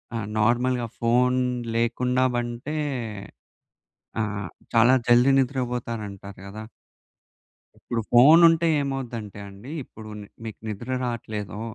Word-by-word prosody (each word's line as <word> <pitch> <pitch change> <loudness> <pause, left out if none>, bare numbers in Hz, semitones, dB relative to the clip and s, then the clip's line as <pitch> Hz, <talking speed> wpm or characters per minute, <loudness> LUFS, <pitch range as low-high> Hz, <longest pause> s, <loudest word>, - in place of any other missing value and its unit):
ఆహ్, 110 -3 -3
నార్మల్‌గా 120 +2 +2
ఫోన్ 125 +2 +3 0.4
లేకుండా 125 +2 +1
పంటే 120 +5 -4 1.5
ఆ - - +2 0.5
చాలా 120 +3 +6
జల్ది 120 +3 +5
నిద్రపోతారంట 120 -6 -2 0.2
కదా. 105 +2 -8 1.2
ఇప్పుడు 115 -1 -3
ఫోనుంటే 165 +6 +7
ఏమవుద్దంటే 120 -7 -5
అండి, 100 +9 -11
ఇప్పుడు 110 -2 -12
ని - - -9 0.2
మీకు 110 -3 -7
నిద్ర 110 +4 -6 0.2
రాట్లేదో, 110 -3 -5
120 Hz, 95 wpm, -25 LUFS, 110-130 Hz, 1.5 s, ఫోనుంటే